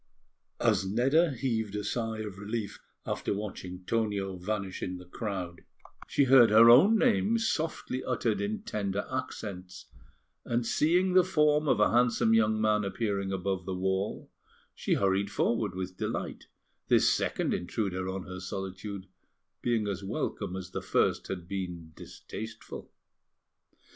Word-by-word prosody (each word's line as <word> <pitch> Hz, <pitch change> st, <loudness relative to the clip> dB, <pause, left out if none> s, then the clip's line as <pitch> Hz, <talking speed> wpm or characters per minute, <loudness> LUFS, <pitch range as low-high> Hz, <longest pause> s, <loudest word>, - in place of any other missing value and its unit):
As -, -, +2 dB
Nedda 135 Hz, +10 st, +3 dB
heaved 110 Hz, -5 st, -2 dB
a 105 Hz, -, -2 dB
sigh 110 Hz, +1 st, -2 dB
of 100 Hz, -3 st, -7 dB
relief 105 Hz, +1 st, -4 dB, 0.3 s
after -, -, -2 dB
watching 95 Hz, -3 st, -6 dB
Tonio 100 Hz, -4 st, -1 dB
vanish 95 Hz, +1 st, -4 dB
in 90 Hz, 0 st, -3 dB
the 90 Hz, -, -11 dB
crowd, 90 Hz, -3 st, -5 dB, 0.5 s
she 140 Hz, -, +2 dB
heard 130 Hz, -3 st, +7 dB
her 115 Hz, +2 st, +8 dB
own 190 Hz, -, +7 dB
name 230 Hz, -1 st, +3 dB
softly 160 Hz, -, -2 dB
uttered 115 Hz, -5 st, 0 dB
in 105 Hz, +1 st, -3 dB
tender 100 Hz, -1 st, -2 dB
accents; 90 Hz, -1 st, -5 dB, 0.6 s
and, 120 Hz, 0 st, -1 dB
seeing 180 Hz, +9 st, +2 dB
the 185 Hz, 0 st, +7 dB
form 150 Hz, -4 st, +2 dB
of 120 Hz, -, +3 dB
a 105 Hz, -, +4 dB
handsome 120 Hz, -1 st, +3 dB
young 110 Hz, -1 st, +3 dB
man 105 Hz, -1 st, +2 dB
appearing 100 Hz, -1 st, -2 dB
above 95 Hz, -1 st, -2 dB
the 95 Hz, -, -2 dB
wall, 95 Hz, +2 st, -2 dB, 0.4 s
she -, -, 0 dB
hurried 100 Hz, 0 st, +1 dB
forward 105 Hz, -2 st, 0 dB
with 95 Hz, 0 st, -5 dB
delight, -, -, -4 dB, 0.4 s
this -, -, +4 dB
second -, -, -1 dB
intruder 95 Hz, 0 st, -2 dB
on 95 Hz, 0 st, -4 dB
her 95 Hz, 0 st, -7 dB
solitude 95 Hz, +1 st, -6 dB, 0.6 s
being 115 Hz, -3 st, 0 dB
as 100 Hz, -1 st, -3 dB
welcome 95 Hz, -1 st, -3 dB
as 90 Hz, -1 st, -7 dB
the -, -, -4 dB
first -, -, +1 dB
had 90 Hz, -3 st, -5 dB
been 90 Hz, -4 st, -5 dB
distasteful. 110 Hz, +1 st, -9 dB
105 Hz, 145 wpm, -29 LUFS, 95-115 Hz, 0.6 s, her